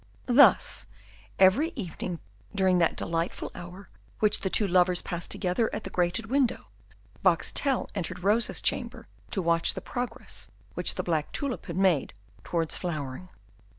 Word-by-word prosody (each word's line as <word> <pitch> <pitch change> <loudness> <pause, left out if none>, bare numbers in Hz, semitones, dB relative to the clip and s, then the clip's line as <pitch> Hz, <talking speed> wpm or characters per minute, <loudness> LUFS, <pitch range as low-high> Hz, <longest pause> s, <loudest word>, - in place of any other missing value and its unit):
Thus, 250 -3 +5 0.5
every 200 - +4
evening 180 - -5 0.3
during 190 -2 +3
that 170 - +2
delightful 165 +1 -2
hour 180 +3 -10 0.3
which 210 -1 +3
the 190 - -2
two 205 +2 +2
lovers 180 -1 +3
passed 170 -1 -4
together 190 +4 0
at 210 - -5
the 190 - -7
grated 180 +5 0
window, 250 0 0 0.5
Boxtel 275 -3 +1
entered 175 0 -4
Rosa's 215 +4 +2
chamber - - -2 0.2
to 190 - -2
watch 170 0 +2
the - - -3
progress 245 -3 -6 0.2
which - - +1
the - - -2
black 160 -3 -1
tulip 280 -4 -3
had - - -4
made 185 - +2 0.3
towards 165 -2 -1
flowering. 155 -1 -4
185 Hz, 145 wpm, -28 LUFS, 175-225 Hz, 0.5 s, Thus